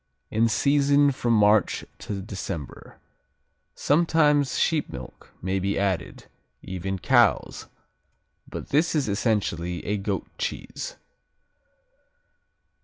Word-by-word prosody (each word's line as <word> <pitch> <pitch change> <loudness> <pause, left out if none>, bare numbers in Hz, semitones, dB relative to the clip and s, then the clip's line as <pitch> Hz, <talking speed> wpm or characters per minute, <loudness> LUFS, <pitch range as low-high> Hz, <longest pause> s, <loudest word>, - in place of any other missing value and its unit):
In 115 +1 +2
season 140 +3 +3
from 120 -3 0
March 105 -1 +3
to 100 -2 -5
December. 95 -7 -7 0.8
Sometimes 150 -2 +2
sheep 160 -3 +1
milk 65 -1 -10
may 95 +1 0
be 100 +2 -1
added, 95 -3 -2 0.4
even 95 +1 -4
cow's, - - +2 0.8
but - - -7
this 160 +4 +2
is 145 -4 +1
essentially 100 -5 -1
a 105 +1 0
goat 100 0 -2
cheese. - - -4
105 Hz, 100 wpm, -25 LUFS, 95-145 Hz, 0.8 s, season